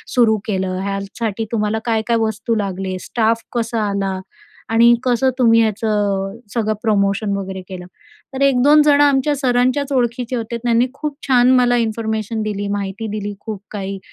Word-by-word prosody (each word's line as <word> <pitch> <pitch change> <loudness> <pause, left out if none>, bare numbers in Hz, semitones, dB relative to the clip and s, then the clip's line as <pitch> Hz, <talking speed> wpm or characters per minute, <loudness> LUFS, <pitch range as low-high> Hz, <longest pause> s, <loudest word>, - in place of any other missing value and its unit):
सुरू 230 -3 +4
केलं, 190 -3 -1
ह्यासाठी 200 +2 -3
तुम्हाला 215 0 0
काय 225 -2 +1
काय 235 -1 +2
वस्तू 220 +1 -1
लागले, 190 -2 -3
स्टाफ 230 0 0
कसा 230 -1 -1
आला 195 -1 -2 0.5
आणि 235 +1 +6
कसं 255 +1 +2
तुम्ही 230 -2 +5
याचं 205 -2 -1 0.2
सगळं 215 -2 0
प्रमोशन 200 -1 +1
वगैरे 190 -1 -5
केलं 180 -2 -7 0.5
तर 265 - -4
एक-दोन 275 +2 +5
जणं 290 -1 +5
आमच्या 285 +1 +2
सरांच्याच 255 +1 +1
ओळखीचे 245 0 -1
होते 235 0 -3
त्यांनी 235 +1 +2
खूप 295 +1 -5
छान 250 -1 +5
मला 245 -1 +3
इन्फॉर्मेशन 220 -1 -2
दिली, 205 -1 -3
माहिती 200 +2 -3
दिली 205 -1 -4
खूप 215 -3 -6
काही 195 -1 -5
225 Hz, 155 wpm, -19 LUFS, 200-245 Hz, 0.5 s, आणि